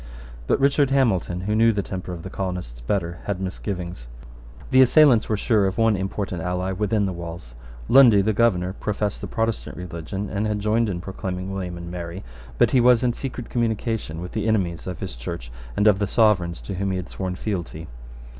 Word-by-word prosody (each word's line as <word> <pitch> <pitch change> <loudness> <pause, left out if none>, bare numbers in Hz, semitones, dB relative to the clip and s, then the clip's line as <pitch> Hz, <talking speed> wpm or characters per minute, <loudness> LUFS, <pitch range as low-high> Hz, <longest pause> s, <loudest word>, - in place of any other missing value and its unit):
But - - +2
Richard 140 0 +3
Hamilton, 100 -10 +1
who 105 +3 -1
knew 115 +1 +5
the 100 -2 -1
temper 95 -1 -6
of 85 -2 -7
the 95 - -7
colonists 90 -11 -4
better, 85 +5 -2
had 100 -3 -2
misgivings. 90 - -5 0.6
The 130 - +7
assailants 130 -3 +6
were 110 - +1
sure 105 -2 +2
of 95 - -3
one 115 -2 +3
important 95 -2 -3
ally 90 +2 -2
within 105 +2 0
the 95 - -2
walls. 85 -7 -8 0.3
Lundy, 120 -7 +7
the 110 +2 +1
Governor, 95 -5 +2
professed 105 0 -2
the - - -4
Protestant 115 0 -2
religion, 90 +3 -5
and 105 +2 -1
had 105 -1 -1
joined 110 +2 +1
in 90 -3 -3
proclaiming 95 0 -5
William 90 -3 -4
and 85 0 -7
Mary; 85 +1 -6 0.3
but - - +4
he 130 - +4
was 125 0 +5
in 120 -1 +2
secret 125 -3 -6
communication 110 -7 -1
with 90 - -6
the 110 0 -2
enemies 95 -7 0
of 90 -3 -5
his - - -5
Church - - -6 0.3
and 105 - +2
of 105 -3 +5
the 100 - 0
Sovereigns 95 -7 +2
to 100 - -6
whom 95 +1 -2
he 95 - -1
had 90 0 -5
sworn 95 -1 -4
lealty. 85 -5 -4
95 Hz, 200 wpm, -23 LUFS, 90-110 Hz, 0.6 s, The